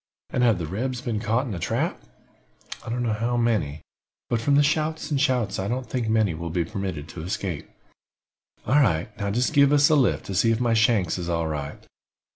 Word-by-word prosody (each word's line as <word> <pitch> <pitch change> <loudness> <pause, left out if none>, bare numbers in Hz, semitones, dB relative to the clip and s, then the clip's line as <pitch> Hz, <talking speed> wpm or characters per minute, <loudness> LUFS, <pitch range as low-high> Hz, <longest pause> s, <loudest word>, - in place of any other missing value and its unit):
And 125 - 0
have 115 -5 +4
the 85 - -3
rebs 120 +9 -3
been 115 -3 -2
caught 115 +4 0
in 120 - -4
a 90 - -4
trap?" - - -1 0.8
"I - - -8
don't 120 +1 -1
know 115 -2 0
how 115 +3 -1
many, 105 -11 0 0.5
but 115 -2 +1
from 140 +4 +2
the 145 - +5
shots 155 +1 -1
and 140 -2 +1
shouts 125 -8 +1
I 95 - -2
don't 125 +3 -3
think 120 -4 -2
many 110 -5 +2
will 85 +1 -5
be 85 +1 -1
permitted 90 -5 -5
to 80 - -8
escape." 90 -2 -4 1.0
"All 145 +3 +4
right. 105 - 0
Now 100 -1 -1
jist 120 +8 0
give 140 -1 +5
us 145 -1 +5
a - - +6
lift, 95 - +2
to 100 - -5
see 100 +5 +3
if 115 0 +2
my 120 -2 +2
shanks 110 -6 +2
is 85 0 -4
all 85 -1 0
right. 75 -2 -5
110 Hz, 220 wpm, -25 LUFS, 90-125 Hz, 1.0 s, a